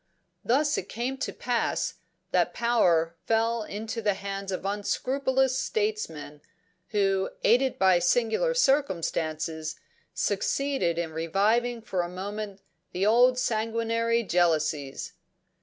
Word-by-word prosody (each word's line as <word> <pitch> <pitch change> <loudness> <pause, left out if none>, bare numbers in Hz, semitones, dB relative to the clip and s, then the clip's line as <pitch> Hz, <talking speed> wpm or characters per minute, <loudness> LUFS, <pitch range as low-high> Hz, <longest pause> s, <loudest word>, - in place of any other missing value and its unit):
Thus 290 +5 +2
it 185 - -8
came 250 +4 -3
to - - -2
pass 240 -2 -1 0.3
that - - +1
power 175 -9 +2
fell 230 +1 +2
into 215 +2 -5
the 205 -2 +1
hands 195 0 -5
of 185 0 -4
unscrupulous 260 +6 0
statesmen, 340 - -2 0.5
who, 195 -2 +1
aided 250 +3 +3
by 185 -2 +4
singular 235 - +2
circumstances, 160 - 0 0.4
succeeded 270 -12 0
in 165 -2 -3
reviving 215 +9 +1
for 185 -5 -1
a 175 - -4
moment 200 +2 -6 0.3
the 185 +2 0
old 245 +4 +5
sanguinary 230 0 0
jealousies. 155 -7 0
215 Hz, 110 wpm, -27 LUFS, 180-245 Hz, 0.5 s, old